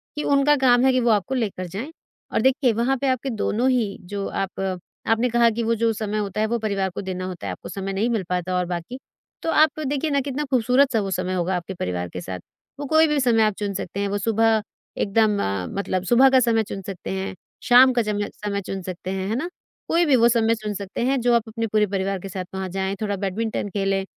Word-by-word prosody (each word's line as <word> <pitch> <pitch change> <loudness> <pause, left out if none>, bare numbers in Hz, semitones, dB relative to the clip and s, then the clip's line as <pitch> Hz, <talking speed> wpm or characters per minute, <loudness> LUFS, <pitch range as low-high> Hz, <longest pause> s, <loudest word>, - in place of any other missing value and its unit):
कि 295 - -3
उनका 285 +1 +4
काम 245 -1 +5
है 265 - +5
कि 255 - +2
वो 240 -1 +2
आपको 215 +5 +1
लेकर 205 -7 -2
जाएँ। 210 - -6 0.4
और - - +2
देखिए 265 -1 +3
वहाँ 240 +5 +1
पे 280 - +1
आपके 260 +1 0
दोनों 230 +2 0
ही 230 -6 0 0.2
जो 200 -1 -2
आप 195 -1 -4 0.5
आपने 225 +2 +2
कहा 235 0 +4
कि 230 +1 -2
वो 230 +1 +1
जो 230 -1 +3
समय 215 -1 -3
होता 210 0 -2
है 220 - +2
वो - - +2
परिवार 200 -3 -1
को - - -3
देना 185 -1 -4
होता 180 - -6
है, - - -2
आपको 90 - -8
समय 195 0 -4
नहीं 210 +5 0
मिल 225 -5 0
पाता। 180 0 -1
और 180 - 0
बाकी 175 +7 -5 0.4
तो - - -2
आप 310 -1 +3
देखिए 290 +3 -1
ना 280 - +2
कितना 280 +2 -3
खूबसूरत 255 +2 +3
सा 225 - +3
वो 195 -1 -3
समय 185 0 -1
होगा 185 0 0
आपके 180 +2 -6
परिवार 90 - -3
के 90 - -6
साथ। 90 0 -6 0.4
वो 290 - -4
कोई 315 +3 +4
भी 300 -1 +1
समय 235 -4 +3
आप 215 -1 +2
चुन 205 -1 -2
सकते 190 0 -5
हैं, 200 - 0
वो 200 +1 -1
सुबह 225 +1 +2 0.4
एकदम 210 0 +2 0.4
मतलब 185 -2 -1
सुबह 245 +7 +5
का 260 0 +5
समय 230 -3 +2
चुन 200 -1 -6
सकते 195 -3 -6
हैं, 190 0 -3 0.3
शाम 255 +1 +7
का 245 - +2
चम 210 -1 -2
समय 200 -1 -4
चुन 195 0 -5
सकते 185 0 -6
हैं। 190 0 -3
है 220 - 0
ना? 320 +8 -2 0.4
कोई 340 +1 +3
भी 290 -4 +4
वो 235 -1 +5
समय 230 -1 +3
चुन 215 -2 -4
सकते 200 +1 -5
हैं 270 +1 +2
जो 240 0 +3
आप 235 - +2
अपने 225 +1 -3
पूरे 215 0 +2
परिवार 195 0 -2
के 195 - -8
साथ 185 0 -5
वहाँ 190 0 -3
जाएँ, 190 +1 -2
थोड़ा 205 -2 -1
बैडमिंटन 205 +2 -2
खेलें, 195 -1 0
215 Hz, 245 wpm, -23 LUFS, 195-245 Hz, 0.5 s, शाम